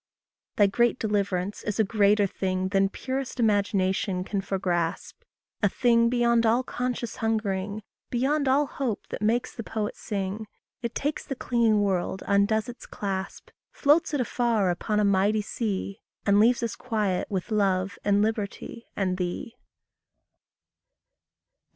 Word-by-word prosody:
Thy 205 Hz, -, +5 dB
great 235 Hz, +5 st, +2 dB
deliverance 200 Hz, -3 st, -1 dB
is 210 Hz, +1 st, -3 dB
a -, -, +6 dB
greater 205 Hz, 0 st, +3 dB
thing 185 Hz, -1 st, -2 dB
Than 195 Hz, 0 st, +2 dB
purest 260 Hz, +3 st, -4 dB
imagination 195 Hz, -3 st, +1 dB
can 200 Hz, +1 st, -2 dB
foregrasp; 180 Hz, -4 st, -1 dB, 0.5 s
A 205 Hz, -, +4 dB
thing 235 Hz, +1 st, +3 dB
beyond 235 Hz, -1 st, +3 dB
all 230 Hz, +3 st, +3 dB
conscious 250 Hz, -2 st, -3 dB
hungering, 210 Hz, -2 st, -1 dB, 0.3 s
Beyond 275 Hz, +4 st, +1 dB
all 275 Hz, +3 st, +4 dB
hope 260 Hz, -6 st, -3 dB
that -, -, -5 dB
makes 235 Hz, +4 st, +1 dB
the -, -, -6 dB
poet 215 Hz, -1 st, -3 dB
sing. 205 Hz, 0 st, -4 dB, 0.3 s
It 235 Hz, -2 st, -4 dB
takes 295 Hz, +2 st, -2 dB
the 270 Hz, -, -5 dB
clinging 230 Hz, -4 st, +2 dB
world, 190 Hz, -1 st, -1 dB
undoes 200 Hz, +3 st, +2 dB
its 245 Hz, 0 st, -9 dB
clasp, 195 Hz, -1 st, -5 dB, 0.2 s
Floats 310 Hz, +3 st, +3 dB
it 290 Hz, -, 0 dB
afar 230 Hz, -6 st, +1 dB
upon 210 Hz, +4 st, -1 dB
a 210 Hz, -, +3 dB
mighty 200 Hz, +2 st, +2 dB
sea, 200 Hz, -2 st, -3 dB, 0.2 s
And 200 Hz, 0 st, +4 dB
leaves 235 Hz, +3 st, +4 dB
us 230 Hz, -, -2 dB
quiet 210 Hz, -6 st, -1 dB
with 195 Hz, +2 st, -3 dB
love 195 Hz, -3 st, +1 dB
and 205 Hz, 0 st, +3 dB
liberty 220 Hz, +1 st, -3 dB
and 185 Hz, -2 st, 0 dB
thee. 180 Hz, +5 st, -4 dB
210 Hz, 140 wpm, -26 LUFS, 195-235 Hz, 0.5 s, a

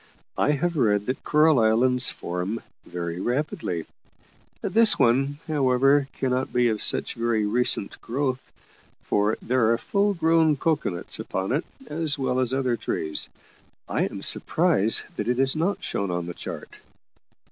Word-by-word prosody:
I 150 Hz, -, +3 dB
have 170 Hz, +3 st, -1 dB
read 105 Hz, -5 st, +2 dB
that 130 Hz, +3 st, -3 dB
coral 150 Hz, -2 st, +4 dB
islands 120 Hz, +3 st, +3 dB
form 90 Hz, +6 st, -4 dB, 0.3 s
very 85 Hz, 0 st, -5 dB
rapidly. 120 Hz, -, -2 dB, 0.8 s
This 220 Hz, +3 st, +4 dB
one, 135 Hz, +3 st, +2 dB
however, 135 Hz, -1 st, +3 dB
cannot 130 Hz, 0 st, -1 dB
be 125 Hz, -1 st, +2 dB
of 110 Hz, -2 st, -2 dB
such -, -, 0 dB
very 115 Hz, -2 st, 0 dB
recent 110 Hz, -2 st, -1 dB
growth, 130 Hz, +1 st, -3 dB, 0.5 s
for 105 Hz, +1 st, 0 dB
there 120 Hz, -2 st, +2 dB
are 115 Hz, -, +2 dB
full 200 Hz, -, 0 dB
grown 160 Hz, -2 st, +3 dB
cocoa 155 Hz, +1 st, 0 dB
nuts 85 Hz, -2 st, -5 dB
upon 95 Hz, 0 st, -3 dB
it, 145 Hz, +6 st, 0 dB, 0.2 s
as 155 Hz, -3 st, -1 dB
well 130 Hz, -2 st, 0 dB
as 130 Hz, -1 st, 0 dB
other 130 Hz, -2 st, +1 dB
trees; 80 Hz, -9 st, -1 dB, 0.6 s
I -, -, 0 dB
am -, -, -6 dB
surprised 105 Hz, +4 st, +2 dB
that -, -, -3 dB
it 125 Hz, 0 st, +1 dB
is 135 Hz, +2 st, +2 dB
not 175 Hz, +6 st, -1 dB
shown 100 Hz, -1 st, -2 dB
on 90 Hz, -1 st, -2 dB
the 85 Hz, -, -6 dB
chart." -, -, -7 dB
125 Hz, 150 wpm, -25 LUFS, 110-145 Hz, 0.8 s, coral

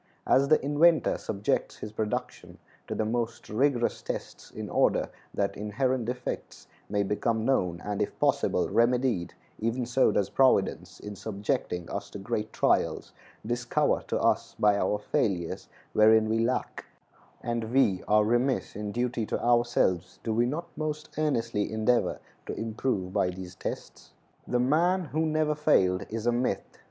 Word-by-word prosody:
As 140 Hz, +1 st, +4 dB
the 155 Hz, -, +5 dB
inventor 155 Hz, +3 st, +4 dB
subjects 100 Hz, 0 st, -2 dB
his 105 Hz, -, -7 dB
production 110 Hz, 0 st, -4 dB, 0.3 s
to -, -, -3 dB
the 110 Hz, -, 0 dB
most 115 Hz, +1 st, -3 dB
rigorous 120 Hz, +2 st, +1 dB
tests -, -, -6 dB
in -, -, -7 dB
order -, -, +2 dB, 0.2 s
that 100 Hz, -1 st, -1 dB
inherent 120 Hz, +4 st, -1 dB
defects 125 Hz, +2 st, -5 dB, 0.2 s
may 100 Hz, 0 st, +1 dB
become 110 Hz, +2 st, 0 dB
known 90 Hz, -10 st, +1 dB
and, 105 Hz, 0 st, -2 dB
if 105 Hz, -, -2 dB
possible, -, -, +2 dB
remedied, 120 Hz, -6 st, +1 dB, 0.2 s
even 115 Hz, +3 st, -1 dB
so 125 Hz, +2 st, +3 dB
does 100 Hz, -2 st, 0 dB
Providence, 135 Hz, -1 st, +2 dB
in 105 Hz, 0 st, -7 dB
subjecting 100 Hz, -3 st, -3 dB
us -, -, -4 dB
to -, -, -8 dB
great 105 Hz, +1 st, -3 dB
trials, -, -, +1 dB, 0.3 s
discover 120 Hz, +1 st, 0 dB
to -, -, -1 dB
us -, -, +1 dB
by 105 Hz, -1 st, +4 dB
our 105 Hz, +1 st, +1 dB
failures 95 Hz, -4 st, -1 dB, 0.3 s
wherein 110 Hz, 0 st, +5 dB
we 110 Hz, +1 st, +1 dB
lack; 120 Hz, +3 st, -1 dB, 0.6 s
and 120 Hz, -1 st, -2 dB
we 115 Hz, -8 st, +3 dB
are 105 Hz, 0 st, +5 dB
remiss 120 Hz, +4 st, 0 dB
in 105 Hz, 0 st, -4 dB
duty 120 Hz, 0 st, -1 dB
to -, -, -2 dB
ourselves 120 Hz, -7 st, +1 dB
do 110 Hz, -, -1 dB
we 120 Hz, +2 st, +2 dB
not 155 Hz, +7 st, -3 dB
most 155 Hz, 0 st, -4 dB
earnestly 115 Hz, -9 st, 0 dB
endeavor 110 Hz, +2 st, +1 dB, 0.3 s
to -, -, -4 dB
improve 110 Hz, -4 st, -2 dB
by 100 Hz, -3 st, +2 dB
these 90 Hz, 0 st, -7 dB
tests? -, -, -7 dB, 0.3 s
The 125 Hz, -, +1 dB
man 170 Hz, +8 st, +2 dB
who 160 Hz, +1 st, +1 dB
never 155 Hz, -1 st, +1 dB
failed 100 Hz, -11 st, +2 dB
is 115 Hz, 0 st, -4 dB
a 120 Hz, -, +4 dB
myth. 120 Hz, +2 st, -2 dB
115 Hz, 155 wpm, -28 LUFS, 105-130 Hz, 0.6 s, the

